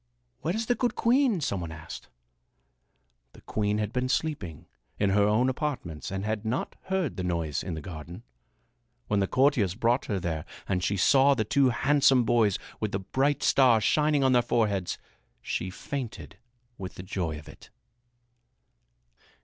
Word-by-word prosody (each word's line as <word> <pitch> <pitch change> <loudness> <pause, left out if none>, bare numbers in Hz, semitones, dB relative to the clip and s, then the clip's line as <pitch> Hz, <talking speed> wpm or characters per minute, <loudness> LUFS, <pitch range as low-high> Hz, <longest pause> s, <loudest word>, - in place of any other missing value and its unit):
"Where 170 +4 -2
is 225 +1 -1
the 245 - +2
good 245 0 -1
queen?" 240 - +3
some 100 -9 -1
one 85 -1 -5
asked. 80 +2 -9 1.2
The - - -16
queen 105 -1 -1
had 105 0 -2
been 125 0 -1
sleeping 90 - -2 0.3
in 100 -1 +2
her 100 +1 +4
own 110 +5 +3
apartments 130 - -3
and 95 +1 -4
had 110 0 -2
not 115 +3 -2
heard 190 -6 -1
the 90 - -2
noise 85 -4 -1
in 90 -2 -4
the 80 - -7
garden. 85 +4 -8 0.9
When 105 - +2
the 100 - +1
courtiers 125 -9 +2
brought 120 +3 +1
her 100 -3 -1
there 80 -3 -3 0.2
and 90 -2 -1
she 100 +3 0
saw 135 +8 +5
the 110 -4 0
two 135 +4 +3
handsome 135 0 +4
boys 110 -4 +3 0.2
with 110 -1 -3
the 95 - 0
bright 135 +9 0
stars 120 -5 +4
shining 150 -2 +3
on 130 - +4
their 125 -1 +5
foreheads, 105 -7 0 0.4
she 95 - -3
fainted 115 -2 -6 0.4
with 95 -1 -7
the 90 - -8
joy 90 -5 -3
of 75 - -12
it. - - -14
110 Hz, 165 wpm, -28 LUFS, 95-135 Hz, 1.2 s, saw